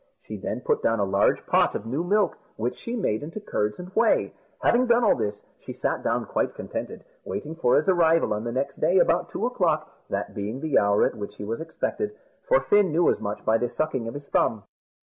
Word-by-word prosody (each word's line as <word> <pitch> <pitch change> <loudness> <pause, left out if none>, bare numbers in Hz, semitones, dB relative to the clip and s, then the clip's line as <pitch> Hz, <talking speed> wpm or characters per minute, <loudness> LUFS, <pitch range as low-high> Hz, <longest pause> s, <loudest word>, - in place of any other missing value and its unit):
She - - -7
then - - -4
put 465 -2 0
down 115 -1 +1
a - - +2
large 100 +1 +2
pot - - +3
of 105 - -4
new 135 +9 -2
milk, 205 +3 +2 0.2
which 120 +3 -2
she 235 - -5
made 110 - -1
into 165 +8 -6
curds 105 - -2
and 180 - -8
whey. - - +2 0.3
Having 250 +1 +4
done 240 0 +4
all 215 - +5
this, 105 0 -3 0.2
she - - -8
sat - - -2
down - - 0
quite - - -1
contented, - - -6 0.2
waiting 155 - -5
for 125 -7 +3
his 150 - +1
arrival 165 - +3
on 105 +1 -3
the 120 - -3
next 135 +3 -2
day 175 +4 +3
about 170 -1 +3
two 225 - -2
o'clock, 165 -11 0 0.2
that 100 +1 -3
being 105 +4 -4
the 155 +1 +2
hour 100 0 +3
at - - 0
which 105 -2 -7
he - - -8
was 115 +7 -4
expected 420 - -3 0.3
for - - +4
Fin 205 -4 +3
knew 170 +3 +4
as - - -2
much 105 0 -5
by 110 +1 +3
the 120 - -1
sucking 130 -6 -2
of 115 - -6
his 145 0 -8
thumb. 110 -3 +1
150 Hz, 230 wpm, -25 LUFS, 110-185 Hz, 0.3 s, all